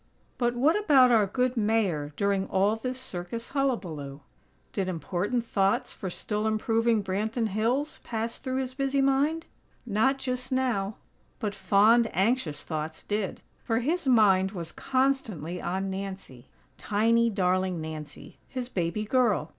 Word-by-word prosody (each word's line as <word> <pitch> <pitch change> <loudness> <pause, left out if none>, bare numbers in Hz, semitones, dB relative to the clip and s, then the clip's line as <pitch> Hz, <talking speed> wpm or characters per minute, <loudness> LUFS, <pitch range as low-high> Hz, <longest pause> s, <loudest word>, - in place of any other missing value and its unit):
But 240 -1 +1
what 285 +7 +3
about 280 -12 +5
our 215 -4 +4
good 250 +5 0
Mayor 205 -10 +1
during 200 -1 +1
all 200 +3 +2
this 255 +3 -4
circus 230 -1 -6
hullabaloo? 170 - -2 0.5
Did 195 -2 -1
important 185 +7 -2
thoughts 195 -3 +1
for 190 - -5
still 210 +4 -2
improving 225 0 +1
Branton 220 +4 -1
Hills 240 +9 -1
pass 230 0 -3
through 260 0 -3
his 260 -1 -4
busy 275 +1 0
mind? 280 +4 +2 0.4
Not 240 +5 +2
just 255 0 -4
now; 230 -6 0 0.4
but 210 -4 -3
fond, 205 +4 +4
anxious 190 - 0
thoughts 155 0 -5
did; 205 -2 -3 0.2
for 230 0 0
his 315 +4 -1
mind 195 -5 +4
was 170 -3 -6
constantly 235 - -1
on 190 +2 -2
Nancy; 190 -10 -7 0.3
tiny, 230 +3 +2
darling 185 -3 0
Nancy, 155 -1 -8
his 255 -2 -5
baby 185 +1 -2
girl. 215 - +2
215 Hz, 140 wpm, -27 LUFS, 190-250 Hz, 0.5 s, about